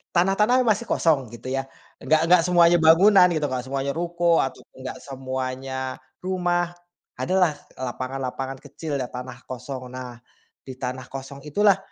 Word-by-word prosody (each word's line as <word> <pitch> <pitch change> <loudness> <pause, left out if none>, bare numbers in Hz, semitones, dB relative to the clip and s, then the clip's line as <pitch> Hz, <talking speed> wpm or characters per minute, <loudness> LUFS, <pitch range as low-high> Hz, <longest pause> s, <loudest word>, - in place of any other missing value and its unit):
tanah-tanah 210 +8 +4
yang 240 - +2
masih 215 +2 +1
kosong, 145 -7 +2
gitu 130 +3 -7
ya, 135 0 -1 0.4
enggak 155 +1 +3
enggak 180 0 +6
semuanya 175 -1 +5
bangunan, 180 +4 +7
gitu, 155 -3 0
enggak 130 -2 -2
semuanya 135 +1 -2
ruko, 170 0 +2
ataupun, 135 - -7
enggak 130 - -5
semuanya 130 0 -4 0.4
rumah, 175 -2 0 0.5
ada 185 - -1
lah, 180 -4 +4 0.3
lapangan-lapangan 130 +1 -4
kecil 145 +1 -5
ya, 130 - -1
tanah 125 0 -8
kosong. 130 +1 -6
Nah, 125 -2 -7 0.5
di 130 - -7
tanah 130 0 -4
kosong 135 +1 -8
itulah, 200 +5 +4
140 Hz, 150 wpm, -24 LUFS, 130-175 Hz, 0.5 s, bangunan